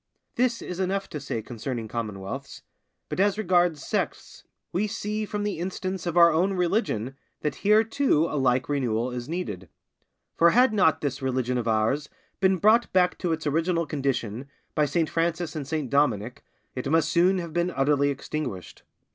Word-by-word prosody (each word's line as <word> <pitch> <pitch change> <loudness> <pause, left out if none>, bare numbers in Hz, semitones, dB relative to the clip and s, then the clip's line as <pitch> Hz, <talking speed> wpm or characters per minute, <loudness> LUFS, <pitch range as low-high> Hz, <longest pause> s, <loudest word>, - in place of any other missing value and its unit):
This 245 -1 0
is 180 0 -6
enough 195 +1 -1
to 150 - -5
say 115 -5 -4
concerning 115 0 -5
commonwealths, 105 -4 -6 0.4
but - - -5
as 205 +1 +3
regards 175 -6 +2
sects, - - -3 0.3
we 200 +4 +1
see 215 0 -3
from 205 0 -3
the 205 -5 -2
instance 185 0 -4
of 170 0 -1
our 170 -1 +8
own 180 +5 +2
religion 175 - 0 0.3
that 150 - -2
here 210 +2 +5
too 225 - +2
a - - -4
like 130 -2 +2
renewal 125 -4 0
is 125 +1 -6
needed. 105 - -4 0.7
For 170 - +6
had 245 +4 +4
not 175 -7 +3
this 145 -1 -2
religion 130 -1 0
of 120 - -3
ours 115 +7 +1 0.3
been 190 -1 +3
brought 220 +6 +4
back 180 -1 +3
to 175 - -1
its 160 -1 -2
original 165 +3 +1
condition 135 -4 -2 0.2
by 150 -1 +2
Saint 160 +3 +1
Francis 170 0 -1
and 145 -3 -4
Saint 150 -4 -3
Dominick, 125 -3 +1 0.3
it 130 +1 -4
must 160 +1 +3
soon 180 +3 +3
have 170 -3 -5
been 175 +1 +1
utterly 140 -2 +2
extinguished. 140 - -5
160 Hz, 170 wpm, -26 LUFS, 130-185 Hz, 0.7 s, our